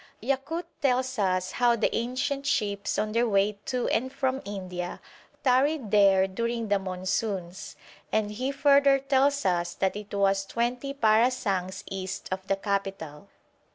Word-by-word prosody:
Yakut 275 +8 -2 0.2
tells 260 -2 +1
us 185 -2 +1
how 240 -1 +3
the 225 - 0
ancient 275 +4 -2
ships 205 -8 0
on 215 0 0
their 230 +1 +1
way 200 0 +1
to 250 -1 -1
and 260 +3 0
from 265 -1 -1
India 185 -3 -5 0.4
tarried 260 -2 +2
there 195 -2 +5
during 230 +3 -3
the 200 -1 +3
monsoons, 185 0 -3 0.4
and 215 -1 0
he 255 +6 -2
further 280 0 +5
tells 275 0 +1
us 175 -2 0
that 190 0 0
it 210 0 -8
was 195 -1 +2
twenty 240 +6 -2
parasangs 220 -6 +1
east 190 0 -5
of 190 0 -4
the 195 - +2
capital. 195 -4 -4
215 Hz, 145 wpm, -27 LUFS, 195-260 Hz, 0.4 s, there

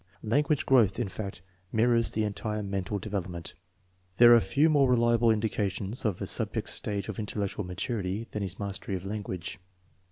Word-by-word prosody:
Language 145 +6 +1
growth, 115 -8 +4
in 115 -4 -1
fact> 95 -2 -6 0.3
mirrors 115 +1 +3
the 110 - -1
entire 105 0 -3
mental 100 0 -2
development. 95 -5 -4 0.6
There 120 0 +9
are - - +7
few 145 +7 +2
more 145 -4 +4
reliable 120 -1 +3
indica 110 -2 +1
tions 100 +6 -3
of 100 -5 0
a - - -2
subject's - - -1
stage 100 -2 -2
of 110 -2 -5
intellectual 105 -1 -3
maturity 95 +3 -3
than 105 - -3
his 95 -1 -4
mastery 100 -1 -4
of 95 0 -6
language. 95 -3 -5
105 Hz, 165 wpm, -28 LUFS, 95-115 Hz, 0.6 s, There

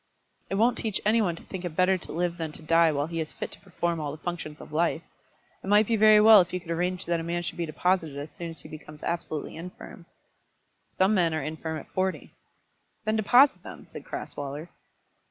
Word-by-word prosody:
"It 195 - -1
won't 230 +5 +3
teach 215 -3 -1
any 225 +2 +4
one 175 -5 0
to - - -12
think 190 -2 -7
it 175 -3 -5
better 185 +2 +4
to 180 - -8
live 175 +1 -1
than 160 -2 -4
to 160 - -9
die 165 +1 +4
while 145 -1 0
he 165 +1 -4
is 155 -1 -4
fit - - -6
to - - -9
perform 170 -3 -2
all 150 -2 -3
the 150 - -8
functions 165 -4 -5
of - - -12
life. 165 +1 +1 0.6
It - - -8
might 210 +2 +5
be 230 - +1
very 215 0 +7
well 215 -1 +9
if 175 - -3
you 180 - -2
could 170 -1 -8
arrange 180 +2 -1
that 170 -1 0
a - - -4
man 170 +1 -2
should 160 - -5
be 170 - -1
deposited 165 -2 0
as 145 +1 -6
soon 170 +2 -7
as 165 - -6
he - - -11
becomes 150 -1 -11
absolutely 160 -3 -3
infirm." 175 0 -10 0.8
"Some 190 +3 +2
men 170 -5 +2
are 155 - -2
infirm 160 +1 -4
at - - -9
forty." 185 0 -2 0.7
"Then 215 0 +1
deposit 245 +6 +5
them," - - -10
said - - -10
Crasweller. 145 +4 -6
170 Hz, 225 wpm, -27 LUFS, 160-190 Hz, 0.8 s, well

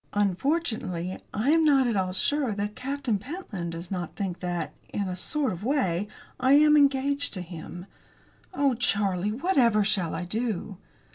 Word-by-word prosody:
"Unfortunately, 205 - -1
I 235 +8 +1
am 325 0 +4
not 280 -4 +5
at 235 -3 0
all 185 -2 0
sure 265 +5 +1
that 205 +1 -3
Captain 265 -5 -2
Pentland 210 - -6
does 170 +2 -7
not 180 -3 -4
think 190 -3 -3
that, 175 -1 -3 0.2
in 200 -2 -2
a 180 - -3
sort 275 - -1
of 180 +3 -8
way, 210 - 0 0.3
I 260 +1 +4
am 300 +1 +6
engaged 280 -2 +3
to 185 - -4
him. 175 +1 -8 0.7
Oh, 280 -7 +2
Charlie, 205 -4 +1
whatever 240 - +3
shall 195 -6 0
I 175 +2 -3
do?" 215 -1 -3
210 Hz, 160 wpm, -27 LUFS, 185-275 Hz, 0.7 s, am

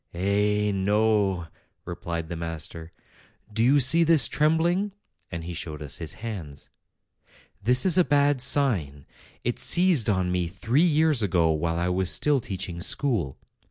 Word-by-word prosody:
"Eh, 105 +3 0
no!" 100 -2 0 0.4
replied 85 -1 -5
the 85 - -6
master; 80 0 -7 0.3
" 110 - -28
do 110 - -2
you 135 +5 +4
see 140 +6 +4
this 160 -7 +4
trembling?" 170 +6 0 0.4
and 85 - -6
he 85 +1 -7
showed 80 -2 -7
us 70 -1 -6
his 80 -3 -7
hands. 80 -11 -8 0.9
'This 125 +4 +3
is 185 -2 +3
a - - +6
bad 145 -2 +1
sign. 95 - 0 0.4
It 120 - -2
seized 175 - +4
on 95 -3 0
me 90 -1 -1
three 110 - -1
years 155 -4 +2
ago, 85 -5 +1
while 80 +2 -2
I 85 +1 -1
was 90 0 0
still 145 -2 +2
teaching 95 -6 -6
school. 100 - -1
100 Hz, 155 wpm, -25 LUFS, 85-140 Hz, 0.9 s, a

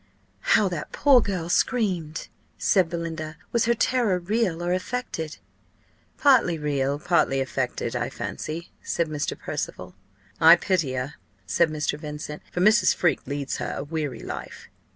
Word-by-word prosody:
"How 210 - +3
that 170 -4 -5
poor 275 -4 +5
girl 185 -6 -2
screamed!" 175 -6 0 0.3
said 185 -4 +3
Belinda. 160 -2 -4
"Was 235 -1 +2
her 235 0 +3
terror 235 -5 +2
real 180 -2 -1
or 175 +1 +1
affected?" 185 - -3 0.8
"Partly 250 - +4
real, 140 -2 0
partly 160 -4 +2
affected, 135 - -2
I - - -1
fancy," 165 +3 -5
said 170 - -1
Mr. 150 -1 -2
Percival. - - -5 0.5
"I 165 +2 +9
pity 175 -6 0
her," 130 +2 -3 0.3
said 170 - +2
Mr. 150 -1 -2
Vincent; 150 -1 -6
"for 180 - -2
Mrs. 215 +4 +5
Freke 175 -6 +1
leads 140 0 -3
her - - -3
a 140 - -3
weary 150 -3 -4
life." - - -7
170 Hz, 145 wpm, -25 LUFS, 150-190 Hz, 0.8 s, I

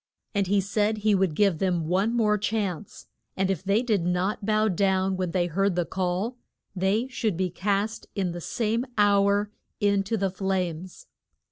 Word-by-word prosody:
And 200 -3 +1
he 200 +2 +3
said 210 +2 0
he 210 0 +2
would 190 -5 +1
give 195 -3 +2
them 175 -4 0
one 190 +7 +1
more 210 -2 +3
chance, 205 -3 -3 0.3
and 190 0 +1
if 190 - -3
they 200 +5 +2
did 215 -8 +1
not 180 +4 -1
bow 215 +1 +2
down 190 0 +1
when 185 -1 -2
they 175 0 +1
heard 190 +2 0
the 175 -1 0
call, 190 +7 -2 0.4
they 195 +6 +1
should 220 -7 -1
be 185 -1 -1
cast 200 +4 -1
in 190 -4 -1
the 175 0 -6
same 230 +5 -1
hour 205 0 +3 0.3
in 200 -1 +2
to 225 +3 -1
the 195 -2 0
flames. 185 - -3
195 Hz, 175 wpm, -26 LUFS, 185-210 Hz, 0.4 s, he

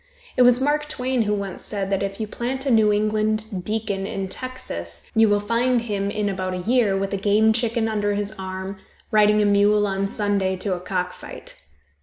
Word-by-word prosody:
It - - +3
was 245 0 +6
Mark 295 +2 +1
Twain 255 -4 0
who 210 -1 +1
once 200 -2 -5
said 200 -2 -3
that 195 - +1
if 195 +1 -3
you 220 - -1
plant 255 +5 -4
a 270 - +1
New 220 -2 +5
England 215 -1 0
deacon 210 -2 -2
in 195 -1 -4
Texas, 135 - -7
you 225 -1 +5
will 205 0 +3
find 235 +4 +1
him 200 -3 -2
in 210 0 -1
about 185 -2 -2
a 180 -1 -5
year 230 -5 +3
with 195 +1 -2
a - - 0
game 210 +3 +3
chicken 230 0 0
under 205 -2 0
his 205 0 -1
arm, 190 +1 -5 0.3
riding 210 0 +4
a - - +2
mule 205 +1 +4
on 195 0 -1
Sunday 200 -2 0
to 185 +1 -2
a 180 - -3
cock 180 0 -2
fight. - - -10
205 Hz, 205 wpm, -23 LUFS, 195-225 Hz, 0.3 s, was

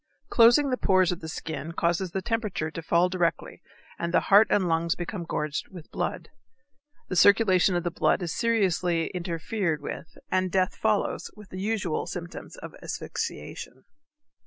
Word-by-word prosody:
Closing 245 +4 +5
the 255 - +1
pores 185 -5 +3
of 180 - -4
the 160 - -7
skin 160 0 -5
causes 175 +3 0
the 190 +2 -4
temperature 210 -9 -2
to 165 - -6
fall 170 +2 +3
directly 180 -2 -2 0.4
and 170 0 -2
the - - +4
heart 205 +2 +8
and 190 -3 +2
lungs 165 0 +1
become 175 +1 -5
gorged 150 -2 -3
with 175 -4 -12
blood. - - -3 0.8
The 185 - -2
circulation 190 -1 +5
of 175 - 0
the 175 - -1
blood 180 - +1
is 165 -2 -3
seriously 185 -7 +1
interfered 170 -1 -2
with 150 +2 -8
and 185 -1 +1
death 185 0 +1
follows 215 -2 0
with 210 -2 -14
the 185 - -6
usual 200 -6 -1
symptoms 170 -1 -7
of - - -9
asphyxiation. - - -6
180 Hz, 160 wpm, -27 LUFS, 170-200 Hz, 0.8 s, heart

